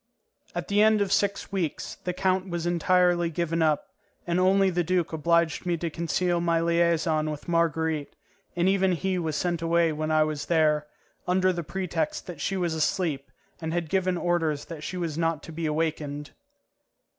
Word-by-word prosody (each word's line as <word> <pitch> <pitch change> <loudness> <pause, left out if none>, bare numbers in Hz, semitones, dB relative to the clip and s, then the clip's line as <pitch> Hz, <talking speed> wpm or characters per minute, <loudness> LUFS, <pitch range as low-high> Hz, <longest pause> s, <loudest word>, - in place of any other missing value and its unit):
At - - -3
the 205 +1 +3
end 215 0 +5
of 200 -1 0
six 200 0 0
weeks 180 -6 -2
the 180 - 0
count 185 +1 0
was 170 -1 -3
entirely 175 0 +3
given 165 0 -1
up, 155 -2 +1 0.4
and 175 0 0
only 190 +1 +4
the 175 0 0
duke 175 -1 0
obliged 170 0 +1
me 175 -2 0
to 165 0 -3
conceal 170 +2 0
my 170 -1 +2
liaison 165 -2 +2
with 150 +2 -6
Marguerite, 160 -3 0 0.4
and 175 +1 +2
even 190 -1 +3
he 185 +2 -1
was 160 -3 -2
sent 170 +1 -1
away 165 0 +2
when 155 0 -3
I 155 0 +4
was 155 -1 -3
there, 155 -3 +2 0.4
under 185 +1 +3
the 175 - -3
pretext 170 -2 -3
that 170 -5 -8
she 195 - -1
was 175 -3 0
asleep 155 -3 -1 0.3
and 160 0 -3
had 170 -2 -2
given 185 -2 +1
orders 165 -4 0
that 160 -3 -8
she 185 - -4
was 165 -3 -3
not 165 -2 0
to - - -9
be 160 0 -3
awakened. 150 -2 -2
170 Hz, 180 wpm, -26 LUFS, 160-180 Hz, 0.4 s, end